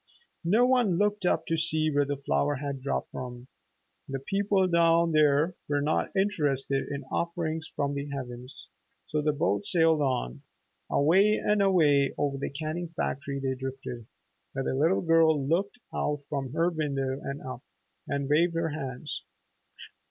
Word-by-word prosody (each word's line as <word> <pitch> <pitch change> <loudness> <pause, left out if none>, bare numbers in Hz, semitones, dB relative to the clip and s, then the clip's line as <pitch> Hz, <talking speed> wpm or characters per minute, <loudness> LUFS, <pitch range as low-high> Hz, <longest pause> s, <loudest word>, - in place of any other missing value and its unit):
No 215 +8 +4
one 245 -8 +3
looked 205 -1 +1
up 165 - +1
to 165 - 0
see 155 -1 +1
where 145 0 +2
the 140 0 -2
flower 100 - 0
had 140 0 -4
dropped 135 +2 -3
from. 125 -1 -7 0.6
The 135 - -2
people 195 +6 +1
down 170 -1 +4
there 155 +2 +3 0.2
were 145 -1 +2
not 150 +2 0
interested 145 -9 0
in 140 0 -4
offerings 165 -2 -2
from 140 -1 -1
the 140 0 -4
heavens. 125 -2 -7 0.4
So 150 - -1
the 150 0 +2
boat 100 -8 0
sailed 160 -3 +3
on. 70 - -1 0.5
Away 190 +9 +4
and 210 -1 +1
away 150 -8 +3
over 140 -1 -1
the - - -2
canning 155 +4 -4
factory 140 0 -2
they 135 -1 -1
drifted, 130 -3 -6 0.5
where 135 0 -3
the - - 0
little 160 +8 +2
girl 165 -2 +4
looked 195 - 0 0.2
out 145 -1 -1
from 135 -3 -3
her 165 +2 +2
window 140 -4 -2
and 140 +1 -5
up, 130 -1 -7 0.5
and 140 -1 -2
waved 165 +4 +3
her 165 0 0
hands. 145 -1 -5
150 Hz, 160 wpm, -28 LUFS, 135-170 Hz, 0.6 s, No